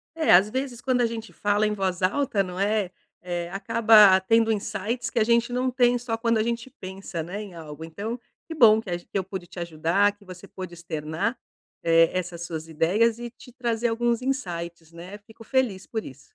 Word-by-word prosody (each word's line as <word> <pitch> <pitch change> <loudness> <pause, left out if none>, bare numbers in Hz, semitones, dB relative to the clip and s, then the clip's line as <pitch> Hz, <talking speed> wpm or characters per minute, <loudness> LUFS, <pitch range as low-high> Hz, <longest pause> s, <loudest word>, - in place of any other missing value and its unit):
É, 320 -1 +3
às 190 +4 +6
vezes, 260 -1 -3
quando 255 -1 +1
a 240 - +4
gente 225 -1 -6
fala 205 +1 +1
em 210 - 0
voz 190 -2 -2
alta, 205 +1 +1
não 180 -1 -7
é, 205 -1 +1 0.3
eh, 175 -1 -4
acaba 210 0 +6
tendo 225 +3 +3
insights 230 +3 -3
que 240 - -1
a 220 - +4
gente 235 +1 +2
não 255 +1 0
tem 245 -1 +3
só 235 -1 -3
quando 230 0 +1
a - - +2
gente 235 +2 -3
pensa, 190 -2 -6
né, 185 +6 -6
em 200 -4 -10
algo. 160 -1 -9
Então, 205 +9 -5 0.3
que 325 - -6
bom 220 -7 +6
que 220 - -8
a 175 - 0
g 175 - -12
que - - -3
eu 190 - -2
pude 190 -1 -7
te 175 - -9
ajudar, 170 +5 +1
que 205 - -21
você 185 +1 -11
pôde 185 -2 -8
externar, 165 - -3 0.5
eh, 165 0 +5
essas 175 -2 -3
suas 160 -2 -5
ideias 200 +9 +2
e 240 0 -6
te 245 +1 -16
trazer 235 -2 -1
alguns 235 0 0
insights, 170 -11 -4
né? 180 +5 -9
Fico 220 +2 -16
feliz 235 -7 0
por 220 -2 -4
isso. 130 - -11
205 Hz, 215 wpm, -25 LUFS, 175-235 Hz, 0.5 s, às